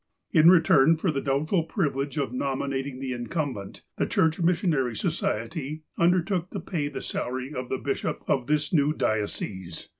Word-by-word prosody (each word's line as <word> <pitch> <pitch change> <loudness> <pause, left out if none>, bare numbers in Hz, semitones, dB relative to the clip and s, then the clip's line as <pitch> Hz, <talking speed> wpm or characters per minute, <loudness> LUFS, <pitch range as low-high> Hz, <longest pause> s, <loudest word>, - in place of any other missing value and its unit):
In 155 +2 +7
return 165 -3 +6
for 165 +1 0
the 140 -2 -2
doubtful 150 +6 +1
privilege 145 -5 -1
of 135 -4 -1
nominating 135 0 -2
the 130 -1 -3
incumbent, 120 - -4
the - - +1
Church 160 0 +2
Missionary 165 - +1
Society 135 +10 -2
undertook 180 +1 +2
to - - -5
pay 155 -6 -2
the 145 - -6
salary 130 +3 -3
of 125 -2 -5
the 130 - -1
bishop 140 0 -3
of 130 -2 +1
this 150 +1 0
new 150 -2 +3
diocese. 100 - -3
140 Hz, 155 wpm, -26 LUFS, 130-160 Hz, -, In